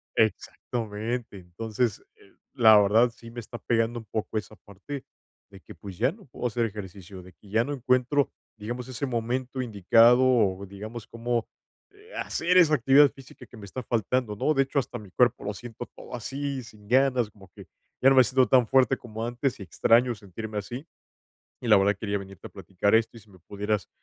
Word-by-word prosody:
exactamente. 110 0 -2
Entonces, 110 - -3
eh, 415 -4 -22 0.2
la 110 -5 +7
verdad 110 +4 +4
sí 115 0 -13
me 120 - -7
está 120 +1 -9
pegando 115 0 0
un 115 - -12
poco 110 0 -3
esa 110 0 -5
parte 100 +10 -9 0.5
de 95 - -13
que, - - -12
pues, 95 -3 -10
ya 135 - +2
no 200 +3 -16
puedo 125 - -8
hacer 120 0 0
ejercicio, 95 -3 -8
de 90 0 -15
que 100 +3 -20
ya 110 +3 +2
no 145 - -3
encuentro, 130 +2 +1 0.3
digamos, 120 +4 -6
ese 130 +2 -3
momento 125 +2 -2
indicado, 115 +2 +5
o 105 -7 +2
digamos, 110 +4 -8
cómo, 115 0 -2 0.4
eh, 420 +4 -18
hacer 180 +2 0
esa 160 -4 +6
actividad 140 +2 +5
física 135 -1 -14
que - - -14
me 105 - -10
está 125 +6 -7
faltando, 115 0 -1
¿no?, 155 - +1
de 135 -2 +3
hecho, 135 +1 -1
hasta 130 - -4
mi 100 -3 -13
cuerpo 120 +3 +2
lo 105 - -2
siento 120 +3 -8
todo - - -9
así, 135 +2 -4
sin 105 -2 -16
ganas, 130 -1 +3
como 100 -3 -18
que - - -12 0.3
ya 135 - +7
no 135 - +4
me 130 - +9
siento 130 +2 +2
tan 125 -2 +5
fuerte 130 -2 +3
como 110 -1 -7
antes 120 +2 -2
y 100 - -6
extraño 115 +7 +3
sentirme 105 +2 -8
así. 120 +8 -7 0.8
Y - - -5
la 105 - +7
verdad 100 +1 +3
quería 100 -1 -2
venirte 95 -2 -11
a - - -11
platicar 95 +2 -1
esto 115 +1 +2
y - - -16
si 105 - -22
me 95 - -17
pudieras, 105 +2 -3
115 Hz, 200 wpm, -26 LUFS, 105-130 Hz, 0.8 s, me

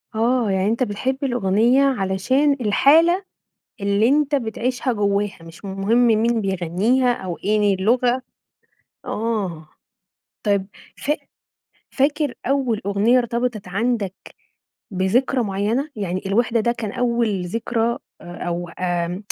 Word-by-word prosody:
آه، 235 0 +1
يعني 190 +1 +1
أنت 230 +3 +1
بتحب 255 +5 -2
الأغنية 240 +1 +2
علشان 260 +4 +2
الحالة 320 - +4 0.6
اللي 200 +3 +2
أنت 290 +1 +2
بتعيشها 250 +1 -1
جوّاها، 205 -1 0
مش 165 +4 -13
مهم 200 +5 +1
مين 225 +1 +2
بيغنيها 195 +7 +1
أو 185 -6 -5
إيه 205 -1 +3
اللغة. 245 +6 +1 0.8
آه، 200 -8 -3 0.8
طيّب 200 -2 +1 0.3
فا 295 +1 -1 0.8
فاكر 290 +2 +1
أوّل 260 -5 0
أغنية 205 +5 +3
ارتبطت 235 -4 -1
عندك 210 -1 -1 0.8
بذكرى 235 +7 +1
معيّنة؟ 210 +8 -1
يعني 185 -3 -3
الوحدة 230 +3 +1
ده 235 +2 +1
كان 225 -4 -4
أوّل 235 -6 0
ذكرى 230 +4 -1 0.2
أ - - -13 0.2
أو 175 0 -3
آمم، 175 +2 -2
225 Hz, 115 wpm, -21 LUFS, 195-250 Hz, 0.8 s, الحالة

